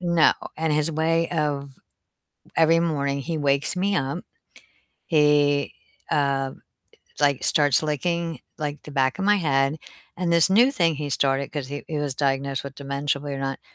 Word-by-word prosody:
No. 170 -3 +4 0.2
And 160 -1 0
his 150 +2 +1
way 165 +1 +1
of 145 -4 -1 0.9
every 165 +1 +4
morning 140 -4 -1
he 160 +4 -3
wakes 140 +2 0
me 195 +2 +1
up. 135 -3 -2 0.8
He, 145 -2 +3 0.4
uh, 135 -2 +1 0.7
like 140 -2 +2
starts 145 -3 +3
licking 165 +2 -2 0.2
like 150 -1 -4
the - - -10
back 130 -2 0
of - - -1
my 205 +1 +4
head, 140 -4 +1 0.4
and 175 -1 -1
this 170 +1 +4
new 240 +7 +5
thing 170 - +1
he 145 0 -4
started, 135 0 0
'cause 145 -4 -4
he 145 +1 -6
he 155 - -2
was 145 -2 -2
diagnosed 135 0 -1
with 140 -1 -7
dementia 140 0 -2
believe 145 0 -5
it - - -6
or - - -6
not, 135 0 -3
145 Hz, 170 wpm, -24 LUFS, 140-165 Hz, 0.9 s, new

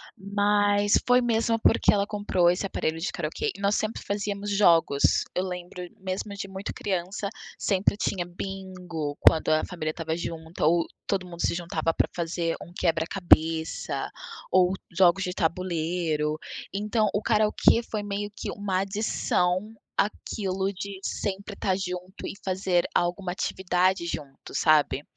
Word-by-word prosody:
Mas 205 0 +2
foi 250 0 +6
mesmo 230 -1 +2
porque - - +4
ela 200 -1 +2
comprou 205 -4 +2
esse 180 - -2
aparelho 160 -3 -2
de 170 - -2
karaokê 160 -4 -2
e 200 - -11
nós 200 +1 +2
sempre 215 +1 -2
fazíamos 205 0 -2
jogos. 170 -8 +4
Eu 180 - 0
lembro 180 0 -6 0.2
mesmo 190 +2 -4
de 200 - -5
muito 190 +1 -5
criança, 190 +1 -2 0.3
sempre 200 0 +1
tinha 185 -3 -1
bingo 180 -4 -5
quando 160 - +5
a 155 0 +3
família 170 -4 -4
estava 160 0 -2
junta 165 -1 -5
ou 170 0 +3 0.2
todo 190 -2 0
mundo 175 -1 -8
se - - +1
juntava 165 -2 -1
para - - +3
fazer 170 -1 -1
um 170 - -10
quebra-cabeça, 165 -1 +1 0.4
ou 185 0 +4 0.2
jogos 185 +1 +5
de 180 -1 -2
tabuleiro, 165 -3 -1 0.4
então 210 +2 +1
o 205 - +1
karaokê 215 +1 +4
foi 215 -2 -2
meio 205 0 -3
que - - -4
uma 195 -2 -1
adição 195 -1 0 0.2
àquilo 195 -2 -1
de 195 0 -6
sempre 200 +1 -3
estar 190 -2 0
junto 180 0 -5
e - - -4
fazer 185 -2 +1
alguma 175 +1 0
atividade 185 -1 +1
junto, 140 -5 -7
sabe? 150 -2 +3
185 Hz, 145 wpm, -27 LUFS, 170-200 Hz, 0.4 s, foi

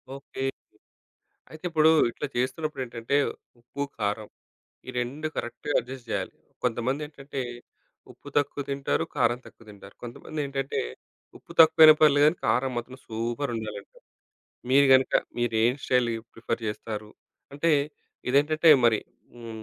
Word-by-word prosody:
Okay. 135 -1 -7 1.1
అయితే 155 +1 -12
ఇప్పుడు 160 -1 +5 0.2
ఇట్లా 145 - -5
చేస్తున్నప్పుడేంటంటే 130 -2 -2 0.4
ఉప్పు, 125 +4 -5 0.2
కారం 105 +1 -2 0.6
ఈ - - -5
2 140 +6 -4
కరెక్ట్‌గా 120 +4 -4
అడ్జస్ట్ 125 0 -10
జేయాలి. - - -2 0.3
కొంతమందేంటంటే 135 +4 -3 0.7
ఉప్పు - - -14
తక్కువ 145 0 +1
తింటారు, 140 0 0
కారం 120 - +2
తక్కువ 115 - -16
తింటారు. 100 -1 -14
కొంతమందేంటంటే 135 +3 -4 0.6
ఉప్పు - - -14
తక్కువైనా 155 -1 +9
పర్లేదు 145 -2 +6
గాని, 155 +3 +3
కారం 130 +1 +1
మాత్రం 120 +2 -5
సూపర్ 120 +5 -3
ఉండాలంటారు. 105 -2 -8 0.7
మీరు 140 +1 +6
గనుక 130 0 +3 0.3
మీరేం 120 0 +2
స్టైల్ 125 -2 +2 0.2
ప్రిఫర్ 115 0 -4
చేస్తారు. 105 0 -5 0.4
అంటే 145 +4 +1 0.6
ఇదేంటంటే, 155 +5 +3 0.2
మరి 115 -3 +5 0.4
హ్మ్, 115 -2 -9
130 Hz, 115 wpm, -26 LUFS, 115-145 Hz, 1.1 s, తక్కువైనా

